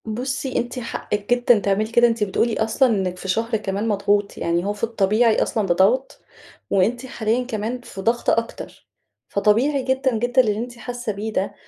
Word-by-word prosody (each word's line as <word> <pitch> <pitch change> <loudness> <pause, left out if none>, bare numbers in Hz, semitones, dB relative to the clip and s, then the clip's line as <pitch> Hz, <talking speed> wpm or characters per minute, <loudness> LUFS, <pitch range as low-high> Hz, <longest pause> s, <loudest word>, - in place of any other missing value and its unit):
بُصي، 255 +4 -3
أنتِ 245 +2 -2
حقِك 210 -3 -4
جدًا 245 -2 +4
تعملي 205 +2 0
كده. 240 +1 +5
أنتِ 230 -2 0
بتقولي 215 +3 0
أصلًا 235 +4 +2
إنك 190 -5 -1
في 190 - -8
شهر 225 +4 0
كمان 205 +1 -3
مضغوط. 205 -1 0
يعني 170 +1 -1
هو 205 - -1
في 205 - -13
الطبيعي 225 +1 +2
أصلًا 215 -3 -1
بضغط، 195 +9 +2 0.5
وأنتِ 230 +6 +1
حاليًا 235 0 -1
كمان 230 +1 -4
في 195 -5 -9
ضغط 230 +4 +1
أكتر. 230 0 -3 0.4
فطبيعي 240 +8 +2
جدًا، 260 -2 0
جدًا 245 +3 +3
اللي 210 -4 0
أنتِ 240 +2 -6
حاسة 245 -1 -5
بيه 215 +2 -5
ده. 195 - -1
225 Hz, 175 wpm, -22 LUFS, 205-245 Hz, 0.5 s, كده